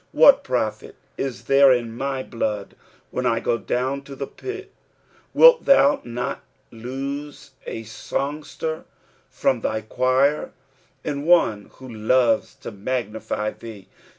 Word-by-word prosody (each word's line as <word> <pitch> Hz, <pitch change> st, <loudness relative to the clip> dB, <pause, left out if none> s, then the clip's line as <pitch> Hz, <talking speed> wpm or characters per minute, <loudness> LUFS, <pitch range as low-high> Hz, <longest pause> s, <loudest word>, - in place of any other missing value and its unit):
" -, -, -26 dB
Wliat -, -, +8 dB
pro/it -, -, -3 dB, 0.2 s
i* 135 Hz, -, 0 dB, 0.2 s
there 135 Hz, 0 st, +6 dB
in 120 Hz, -2 st, 0 dB
my 135 Hz, +1 st, -3 dB
Uood, 105 Hz, -4 st, -3 dB, 0.4 s
when -, -, -1 dB
I 115 Hz, -, +1 dB
go 115 Hz, 0 st, 0 dB
dovm 130 Hz, +4 st, -2 dB
to 140 Hz, -, -9 dB
the 140 Hz, -, -4 dB
pit 390 Hz, -, -8 dB
f" -, -, -35 dB, 0.2 s
Wilt -, -, +7 dB
thou 150 Hz, -, +5 dB
sot 125 Hz, +2 st, -4 dB, 0.3 s
lose 135 Hz, +5 st, -6 dB, 0.2 s
a 115 Hz, -, -5 dB
songster 145 Hz, +8 st, -4 dB, 0.4 s
from 125 Hz, -3 st, 0 dB
thy 110 Hz, 0 st, -1 dB
choir, 130 Hz, +6 st, +1 dB, 0.5 s
and 145 Hz, 0 st, -4 dB
one 115 Hz, -13 st, +3 dB
who 130 Hz, -, -12 dB
loves 115 Hz, 0 st, +1 dB
to -, -, -4 dB
magnify 110 Hz, -1 st, -3 dB
thee 105 Hz, -5 st, -11 dB
130 Hz, 135 wpm, -23 LUFS, 115-140 Hz, 0.5 s, Wliat